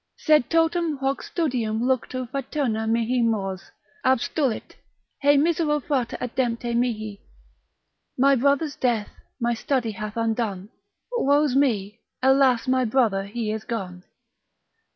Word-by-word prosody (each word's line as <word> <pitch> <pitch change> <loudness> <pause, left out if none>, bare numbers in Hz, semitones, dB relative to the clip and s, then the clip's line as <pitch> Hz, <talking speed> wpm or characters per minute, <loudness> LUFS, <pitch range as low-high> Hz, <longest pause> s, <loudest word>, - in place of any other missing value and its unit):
Sed 305 -5 +3
totum 330 -1 +1
hoc 270 0 -1
studium 245 -10 -1
luctu 255 0 -1
fraterna 260 -5 -2
mihi 230 +2 +1
mors 195 -4 -1 0.3
Abstulit, 260 0 0 0.5
hei 285 0 +5
misero 305 0 +2
frater 265 -4 -2
adempte 240 -1 -2
mihi? 215 -4 -2 1.0
My 275 +2 +5
brother's 280 +3 +1
death 235 -5 0 0.3
my 240 -1 +1
study 235 0 -1
hath 215 +1 -6
undone, 220 -4 -1 0.4
Woe's 290 - +2
me, 220 -6 +1 0.2
alas 265 -2 +4
my 255 0 +2
brother 220 -5 +1
he 215 +1 -3
is 220 0 -4
gone. 185 -6 -5
245 Hz, 115 wpm, -24 LUFS, 220-275 Hz, 1.0 s, hei